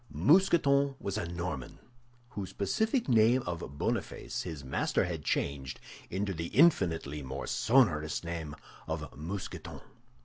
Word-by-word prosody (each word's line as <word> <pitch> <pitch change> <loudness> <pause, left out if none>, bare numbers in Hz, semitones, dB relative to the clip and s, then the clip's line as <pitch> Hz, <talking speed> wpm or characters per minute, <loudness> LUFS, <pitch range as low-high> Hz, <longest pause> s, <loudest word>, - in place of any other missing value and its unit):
Mousqueton 140 -5 +4
was 100 - -3
a 105 -6 -2
Norman, 85 -6 -5 0.5
whose 100 -6 -6
pacific 220 - 0
name 120 +1 +4
of 85 -5 -5
Boniface - - -2
his 80 -6 -6
master 65 - 0
had 85 -4 -4
changed 70 -3 -2 0.3
into 100 +1 -2
the 85 0 -4
infinitely 85 - +3
more 65 0 -5
sonorous 85 - +2
name 85 -3 -5 0.3
of - - -4
Mousqueton. 90 +7 -6
90 Hz, 125 wpm, -31 LUFS, 75-125 Hz, 0.5 s, Mousqueton